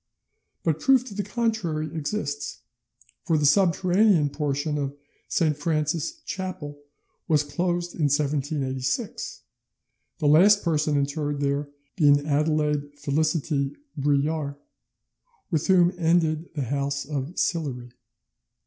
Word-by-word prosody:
But 160 -2 0
proof 265 -2 +4
to 245 - -8
the 205 - -2
contrary 200 -8 -2
exists; 145 -3 -3 0.6
for 165 -4 +2
the 150 - +1
subterranean 180 0 +4
portion 150 0 -1
of 140 0 -3 0.3
St. 155 -3 +1
Francis's 155 - -1
chapel 185 -8 -5 0.5
was 155 -4 +3
closed 175 +3 -2
in 155 - 0
1786, 140 - -1 0.8
the 155 - -3
last 195 +8 +6
person 150 -3 +1
interred 145 +1 -1
there 140 0 -1 0.3
being 145 -5 +4
Adelaide 150 -1 0
Felicite 145 -1 0 0.2
Brulard, 145 0 0 1.0
with 160 -2 0
whom 180 -2 +5
ended 165 -1 +2
the 145 - -1
house 140 +2 -2
of 145 +3 -4
Sillery. 130 -8 -1
150 Hz, 110 wpm, -25 LUFS, 145-175 Hz, 1.0 s, last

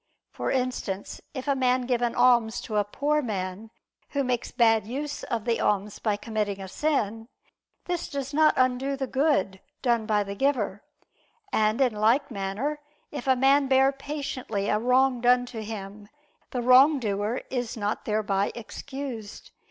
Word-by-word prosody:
For - - -3
instance, 250 -7 -2
if 260 +1 -5
a 280 - +3
man 255 -1 +2
give 245 -1 0
an 240 -1 0
alms 240 -2 +4
to 215 - -3
a 205 - +4
poor 290 +9 0
man 200 -2 -4 0.4
who 280 -1 0
makes 250 -2 -1
bad 225 -4 +3
use 285 +5 -4
of 230 -4 -3
the 235 -1 +1
alms 205 0 0
by 210 -2 0
committing 210 -3 -2
a 190 - -6
sin, 225 -3 -1 0.6
this 350 -1 -3
does 280 -1 -4
not 310 +1 +4
undo 255 +2 +1
the 270 - -2
good 260 -9 +1 0.2
done 235 -4 +1
by 210 -1 +2
the 200 0 -6
giver; 215 -4 0 0.7
and, 215 +2 +2
in 255 -4 +3
like 230 +7 +2
manner, 215 +9 -3 0.3
if 285 -3 -6
a 260 - +5
man 270 +2 +4
bear 265 0 +4
patiently 275 -7 -4
a 210 - +2
wrong 250 +1 +3
done 245 0 +4
to 230 -3 -7
him, 205 -1 -8 0.4
the 250 -2 -3
wrongdoer 250 -4 +4
is 245 -3 -3
not 205 0 -2
thereby 205 -2 0
excused. 235 -1 -7
245 Hz, 160 wpm, -26 LUFS, 210-270 Hz, 0.7 s, a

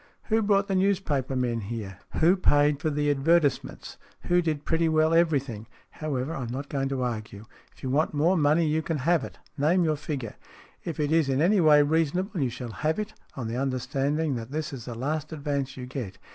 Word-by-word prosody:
Who 220 0 +3
brought 200 -1 +2
the 195 - -1
newspaper 185 -9 +1
men 120 -3 0
here? 100 -3 -6 0.2
Who 170 +4 +6
paid 145 -5 +3
for 155 - 0
the 145 0 +1
advertisements? 145 +1 +1 0.2
Who 175 0 +2
did 155 -4 -2
pretty 165 0 +1
well 155 0 +3
everything? 140 -10 +1 0.2
However, 150 -1 -3
I'm 125 -6 -4
not 135 +4 -5
going 135 -1 -1
to 135 -2 -2
argue. 110 -3 -5 0.3
If - - -22
you 130 - -2
want 150 +4 +2
more 160 +5 +2
money, 155 +1 +3
you 155 +1 +1
can 160 0 -2
have 160 +2 +2
it. - - -8 0.2
Name 170 +5 +3
your 155 -2 +1
figure. 140 -6 -5 0.5
If 165 -2 -5
it 150 0 0
is 160 -3 +3
in 135 0 +1
any 185 +5 +4
way 150 -2 +6
reason 160 +2 +1
able, 185 -2 -2
you 130 - +1
shall 120 -1 -7
have 155 +10 -1
it, 215 0 -4 0.2
on 125 -5 -4
the 115 +2 -3
understanding 135 +3 -1
that 115 0 -7
this 150 +1 -4
is 125 -4 -7
the 120 - -6
last 150 +6 -3
advance 140 -3 -3
you 125 - -6
get. 125 -7 -6
145 Hz, 210 wpm, -27 LUFS, 130-160 Hz, 0.5 s, Who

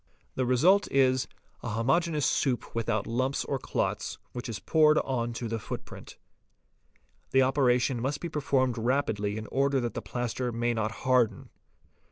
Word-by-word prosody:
The 130 -1 -1
result 180 +11 +4
is, 130 -2 +3 0.3
a - - -4
homogeneous 150 +7 +1
soup 130 -4 0
without 110 -2 -1
lumps 130 +4 -1
or 135 - -2
clots, - - -2
which 120 0 -6
is 110 - -3
poured 155 +3 +4
on 120 -3 -1
to 115 0 -4
the 115 0 -3
footprint. - - -8 1.1
The 130 0 +4
operation 125 -2 +2
must 140 +3 -1
be 170 - -4
performed 135 -6 0
rapidly 110 -4 0
in 110 - -5
order 140 0 +2
that 120 -1 -3
the - - -4
plaster 125 0 -3
may 120 +1 0
not 110 -1 -1
harden. 120 -7 +2
125 Hz, 155 wpm, -28 LUFS, 115-135 Hz, 1.1 s, result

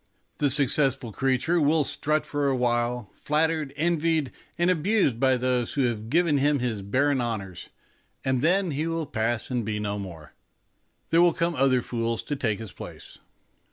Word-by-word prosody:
The 145 - +3
successful 135 -3 +1
creature 135 +9 +1
will 155 +1 +3
strut 155 +2 -1
for 145 -1 -1
a 135 - +2
while, 120 -2 -1
flattered, 155 -1 0
envied, 160 -2 +1 0.3
and 175 +1 +3
abused 180 - +1
by 130 -1 +3
those 125 -1 0
who 140 - +2
have 115 -3 -2
given 160 0 +3
him 145 +1 +3
his 120 -5 -2
barren 130 +7 +1
honours, 100 -7 -4 0.6
and 130 -2 +1
then 180 +3 +2
he 150 +3 -2
will 165 -1 -2
pass 115 0 -2
and 125 -2 0
be 105 0 -3
no 105 -1 -3
more. 85 -7 -9 0.8
There 165 - +5
will 175 -1 +5
come 170 +1 0
other 130 -4 +2
fools 115 -1 -2
to 145 - -3
take 110 -6 -1
his 110 -4 -8
place. - - -10
135 Hz, 170 wpm, -26 LUFS, 120-155 Hz, 0.8 s, There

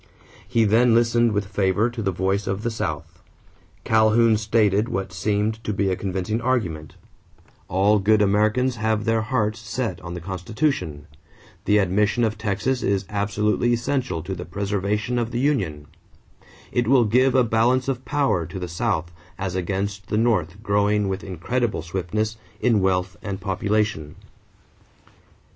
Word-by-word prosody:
He 115 - +2
then 115 +3 +4
listened 120 0 +3
with 105 -1 -1
favor 100 +2 +1
to 120 -1 -5
the 95 -2 0
voice 95 +3 -1
of 95 +2 -2
the 120 - -1
South. 80 -9 -5 0.6
Calhoun 110 +1 +4
stated 105 0 +2
what 95 -1 -3
seemed 105 +4 -1
to - - -2
be 100 -1 0
a - - +1
convincing 95 +4 -2
argument: 90 - -2 0.7
All 100 +4 +3
good 105 +2 +3
Americans 110 +5 +2
have 110 -1 0
their 115 -1 +2
hearts 110 -1 -1
set 115 +2 -4
on 85 0 -7
the - - -5
Constitution; 90 - -2 0.6
the 105 - +4
admission 105 +4 +2
of 110 -1 +1
Texas 110 +4 -1
is 100 -1 0
absolutely 105 +3 +1
essential 120 - -1
to 95 - -4
the 90 -1 -5
preservation 100 +5 -2
of 120 -1 -1
the 120 0 -3
union; 100 - 0 0.9
it 120 -2 0
will 130 -2 +5
give 125 +5 +3
a 130 - +5
balance 120 +3 +2
of 130 -1 -2
power 115 - 0
to - - -7
the 90 -1 -4
South 85 -1 -2 0.3
as 95 -2 -3
against 95 +2 -3
the 105 - -1
North 105 -4 0
growing 105 -1 +1
with 95 0 -3
incredible 105 +3 -2
swiftness 95 +6 -2 0.2
in 115 -4 +3
wealth 95 +1 0
and 100 -3 -5
population. 100 -4 -1
105 Hz, 155 wpm, -23 LUFS, 95-115 Hz, 0.9 s, will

